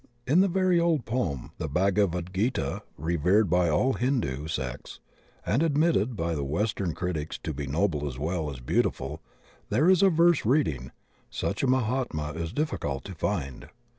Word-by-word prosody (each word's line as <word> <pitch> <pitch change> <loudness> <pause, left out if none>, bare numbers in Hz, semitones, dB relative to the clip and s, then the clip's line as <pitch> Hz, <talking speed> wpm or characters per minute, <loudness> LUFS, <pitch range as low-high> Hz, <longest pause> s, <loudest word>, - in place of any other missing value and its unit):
In 150 +8 +4
the 195 - +5
very 185 -1 +2
old 165 -7 +1
poem 110 - -2
the - - -2
Bhagavad 90 +1 +1
Gita, 115 +7 -1 0.2
revered 85 +6 +2
by 90 -1 +3
all 130 +13 +2
Hindu 115 - -1
sects 65 -5 -5 0.5
and 120 +8 +1
admitted 150 - +2
by 85 -3 -1
the 75 -3 -2
western 85 +4 -1
critics 80 -4 -3
to 80 - -3
be 70 0 -5
noble 75 0 0
as 65 -3 -6
well 80 +2 -2
as 70 -3 -7
beautiful, - - -1 0.5
there 130 +11 +3
is 185 - +4
a 195 - +6
verse 170 0 +4
reading, 105 - +1 0.4
"Such - - -2
a 135 - +1
Mahatma 125 - 0
is 80 +1 -4
difficult 75 - -2
to - - -7
find." 65 -2 -3
90 Hz, 165 wpm, -27 LUFS, -, 0.5 s, a